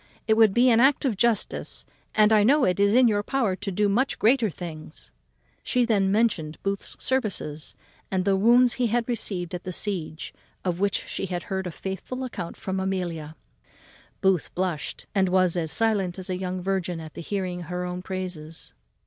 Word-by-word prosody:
It 220 - +5
would 220 -2 +5
be 245 +4 +4
an 225 - +5
act 270 +3 +4
of 245 -6 +1
justice, 225 +1 -1 0.3
and 215 0 +5
I 210 -1 +5
know 280 +6 +4
it 180 +1 +1
is 200 +2 +4
in 255 -1 +6
your 205 -2 +2
power 225 -4 0
to 200 0 -4
do 205 +3 +2
much 240 +7 +1
greater 230 0 +3
things." 155 - -9 0.5
She 250 -1 +1
then 200 -4 +2
mentioned 195 -8 +1
Booth's 195 0 -3
services, 195 - -2 0.3
and 185 -1 0
the 200 -1 +3
wounds 240 +5 +5
he 250 -2 0
had 235 +1 0
received 190 -7 -3
at 180 - -5
the 185 - -4
siege, 170 -5 -3 0.3
of 180 -1 -1
which 200 0 0
she - - -3
had 175 -1 -3
heard 190 -1 -2
a - - -4
faithful 190 +9 -5
account 190 -9 -6
from 190 0 -3
Amelia. 175 -5 -3 0.9
Booth 190 -4 +2
blushed, 180 -4 -3
and 190 -2 +2
was 185 -1 +3
as 160 -3 -1
silent 205 -6 +1
as 185 0 -5
a - - 0
young 185 0 -4
virgin 185 -3 -1
at 160 -1 -9
the - - -7
hearing 185 -1 -3
her 180 0 -3
own 180 0 -4
praises. 180 -4 -6
190 Hz, 190 wpm, -25 LUFS, 180-220 Hz, 0.9 s, in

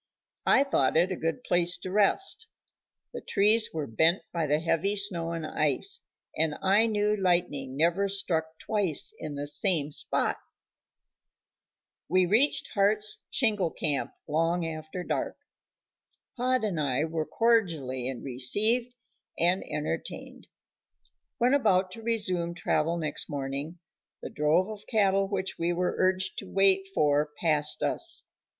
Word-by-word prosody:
I 275 - +5
thought 160 - +1
it 175 +3 +2
a - - -1
good 165 +9 -3
place 175 0 +2
to 185 - -7
rest; 215 - +1 0.7
the - - -6
trees 215 +3 +3
were 155 -2 -3
bent 160 - +2
by 165 -3 -1
the 150 +1 +2
heavy 170 +5 0
snow 180 -5 +1
and 165 -2 -4
ice, 150 -3 0 0.3
and 155 -1 0
I 200 +4 +3
knew 210 -1 +1
lightning 170 -9 -1
never 170 +6 +2
struck 160 -5 -2
twice 200 -7 0
in 150 -2 -6
the 145 0 -4
same 150 -1 +1
spot. - - -1 1.7
We 185 +2 +3
reached 225 +11 +2
Hart's 210 0 +2
shingle 210 - +1
camp 150 -3 -1 0.2
long 165 +3 0
after 155 +2 -6
dark. - - -3 1.0
Pod 255 -1 0
and 195 -7 -2
I 140 0 0
were 160 -1 -2
cordially 155 - 0
received 215 - +1 0.4
and 175 +3 +2
entertained. - - -5 0.9
When 250 0 +2
about 190 -9 +2
to 225 - -10
resume 185 -7 0
travel 170 -1 0
next 155 -3 -3
morning 140 +3 -4 0.5
the - - -6
drove 155 +5 +2
of 215 -1 -9
cattle 195 -3 +2
which 190 -1 -3
we 170 +1 0
were 180 +1 -1
urged 185 0 +1
to 195 - -9
wait 195 0 +3
for 150 -3 +1
passed 150 -3 +1
us. 340 0 +2
180 Hz, 135 wpm, -28 LUFS, 155-205 Hz, 1.7 s, I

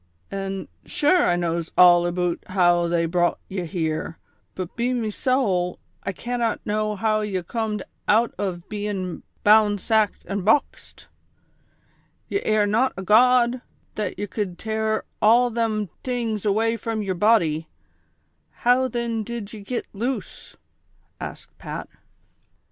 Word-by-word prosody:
"An' 195 0 -4 0.2
shure 355 +2 +3
I 175 - +3
knows 170 -1 -2
all 175 -1 +7
aboot 175 -1 -1
how 175 -2 +3
they 170 0 +1
brot 175 +1 +1
ye 190 -2 -4
here, 160 -1 -3 0.4
but, 185 -2 -5
be 240 +2 0
me 225 -3 -1
sowl, 200 -8 0 0.2
I - - -3
cannot 240 +3 -2
know 215 0 -1
how 215 +1 +1
ye 205 -3 -1
comed 215 +1 -3 0.2
out 230 +3 +3
ov 180 -3 -3
bein' 205 -4 -4
' - - -40
bound, 210 -1 +5
sacked 215 0 +1
an' 200 +2 -3
boxed; 220 +9 0 0.6
' - - -40
ye 400 - 0
air 215 -1 +2
not 225 +6 +2
a 190 - -4
god, 245 +3 +4 0.3
that 210 -4 -3
ye 205 - -2
could 185 -2 -4
tare 220 +1 -1 0.2
all 240 +3 +5
them 220 -2 0
tings 230 -5 -2
away 225 +3 +2
from 225 -1 -3
yer 190 -2 -1
body; 170 -6 +2 1.0
how, 255 +2 +4
thin, 235 -2 -2
did 230 -2 -6
ye 215 - -8
git 235 +5 -4
loose 240 +6 -4
V - - -27 0.4
" - - -41
asked - - -13
Pat. - - -6
210 Hz, 150 wpm, -23 LUFS, 185-230 Hz, 1.0 s, all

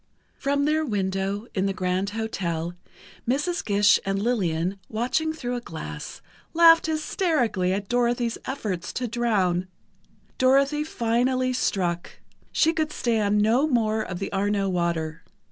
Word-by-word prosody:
From 280 +1 0
their 310 +1 +2
window 195 -3 -2
in 195 0 0
the 195 - -2
Grand 185 +2 -1
Hotel, 175 -6 -2 0.6
Mrs. 295 +7 0
Gish 205 -1 +4
and 195 0 -1
Lillian, 195 -5 0
watching 250 +8 0
through 250 -6 -4
a 245 - -3
glass, 75 - -8 0.3
laughed 330 -1 +7
hysterically 305 - 0
at 195 +1 -2
Dorothy's 240 0 0
efforts 205 -10 -3
to 250 - -2
drown. 200 -7 0 0.7
Dorothy 275 +3 +3
finally 255 -1 0
struck: 175 -8 -1 0.4
she 325 - +3
could 310 -1 -1
stand 210 -5 +1
no 240 +7 +3
more 220 -5 +1
of 185 -4 -5
the 195 - -4
Arno 200 0 +1
water. 170 -3 -1
220 Hz, 130 wpm, -25 LUFS, 190-255 Hz, 0.7 s, laughed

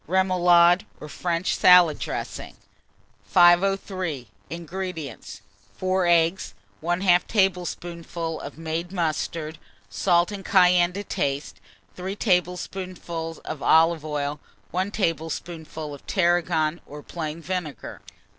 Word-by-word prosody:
REMOULADE, 180 +1 +4
or 150 - -8
FRENCH 170 +2 -1
SALAD 180 -4 +6
DRESSING. - - -5 0.7
503. 175 - +2 0.2
INGREDIENTS. 170 - -6 0.4
4 185 -1 0
eggs, 170 +2 +2 0.3
1/2 175 +2 +2
tablespoonful 175 -4 -2
of 140 - -9
made 165 +2 -4
mustard, 160 -2 -3 0.3
salt 175 - +2
and 200 -1 -6
cayenne 180 -2 +4
to 200 +2 -5
taste, 140 -6 -3 0.3
3 190 +2 -5
tablespoonfuls 180 -3 -2
of 155 -3 -6
olive 165 -1 +4
oil, 145 -1 -3 0.3
1 185 +2 -1
tablespoonful 160 -4 -4
of 140 - -13
tarragon 170 -3 +1
or 145 0 -10
plain 160 -1 -5
vinegar. 170 -7 -5
175 Hz, 100 wpm, -24 LUFS, 160-185 Hz, 0.7 s, SALAD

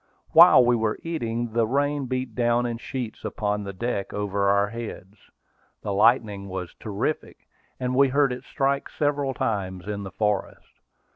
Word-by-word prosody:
While 125 - +8
we 120 0 +4
were 110 -2 0
eating, 120 -8 -3
the 115 -1 +2
rain 140 +2 0
beat 130 -2 -3
down 120 +1 +1
in 120 -1 -3
sheets 120 -2 -6
upon 105 -2 -2
the 100 - -5
deck 100 0 -3
over 100 -1 0
our 100 0 +3
heads. 110 -3 -9 0.5
The 100 - -2
lightning 105 -2 +2
was 90 -2 -5
terrific, 110 +9 -4 0.3
and 125 0 -1
we 140 +2 +5
heard 140 0 +2
it 125 - -8
strike 140 0 -1
several 145 -3 -1
times 100 -7 -2
in 105 -1 -3
the 95 - -6
forest. 105 +1 -3
115 Hz, 160 wpm, -25 LUFS, 100-130 Hz, 0.5 s, While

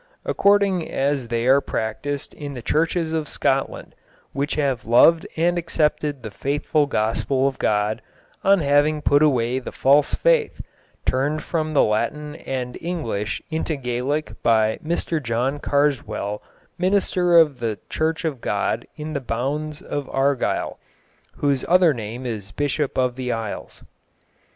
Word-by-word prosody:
According 200 -4 +2
as 135 -2 0
they 115 0 -1
are 135 +2 +5
practised 135 +6 -3
in 145 -2 -7
the 125 - -7
churches 160 +3 0
of 155 -2 -2
Scotland 135 0 -1 0.4
which 140 +2 -1
have 135 -7 -1
loved 160 +8 +5
and 175 +2 +2
accepted 150 -4 -1
the 110 - -6
faithful 145 +4 0
gospel 130 +3 0
of 135 - -3
God, 105 0 +1 0.4
on 195 -2 +4
having 145 +1 +2
put 145 +1 +4
away 130 -4 +2
the 130 - -7
false 140 +2 +3
faith, - - +2 0.5
turned 145 +4 0
from 155 -2 -2
the - - +6
Latin 150 +8 -1
and 125 -2 -5
English 115 - -3
into 160 0 -1
Gaelic 135 +3 -2
by 110 -1 +2
Mr 165 0 -1
John 125 +3 -1
Carswell 140 -8 0 0.4
Minister 180 -2 +3
of 150 -6 +5
the 115 -3 -2
Church 160 +1 -1
of 140 -7 -3
God 105 +3 -1
in 155 0 -6
the 140 - -2
bounds 145 +6 -3
of 145 -2 -4
Argyll, 135 -1 0 0.6
whose 140 -3 0
other 180 -3 +5
name 120 +2 -6
is 105 -5 -4
Bishop 145 +3 -1
of 125 -1 +1
the 125 -1 -2
Isles. 115 -3 -5
140 Hz, 140 wpm, -22 LUFS, 120-155 Hz, 0.6 s, the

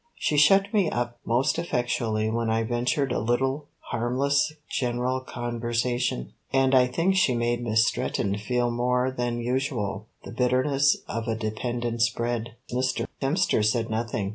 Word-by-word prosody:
She 150 - -1
shut 195 +8 +5
me 200 -6 +3
up 120 0 -3
most 120 +7 +1
effectually 120 -8 -1
when 115 0 -1
I 110 0 +1
ventured 125 +4 0
a - - 0
little 130 +6 0 0.2
harmless 140 +6 +1 0.2
general 125 0 -1
conversation, 120 - -2 0.2
and 135 0 +3
I 125 -1 +6
think 165 +10 +1
she 140 -9 +3
made 120 0 0
Miss 110 -1 +3
Stretton 100 -1 -1
feel 120 +2 0
more 125 +2 +1
than 120 -2 -2
usual 115 -5 -2 0.2
the - - -8
bitterness 135 +3 +2
of 115 0 -4
a 115 - 0
dependent's 120 +1 -1
bread. 120 -1 -3 0.2
Mr. 130 +1 0 0.2
Hemster 140 - +2
said 115 +1 +1
nothing. 110 -2 -2
120 Hz, 145 wpm, -26 LUFS, 115-130 Hz, 0.2 s, I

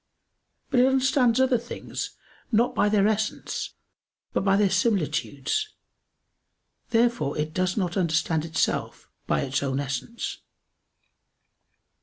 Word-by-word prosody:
But 250 - +4
it 250 - +6
understands 260 -2 +3
other 260 -2 +3
things, 240 - -6 0.3
not 235 +2 +3
by 205 - +2
their 205 -1 +4
essence, 215 0 -2 0.6
but - - +1
by 195 0 +4
their 205 -1 +4
similitudes. 190 - 0 1.1
Therefore 235 -10 +1
it 150 +1 -2
does 185 +2 0
not 180 -4 -1
understand 165 -3 +1
itself 160 -1 -1 0.2
by - - +1
its 135 -1 -1
own 135 -1 -1
essence. 140 - -4
200 Hz, 115 wpm, -26 LUFS, 160-240 Hz, 1.1 s, it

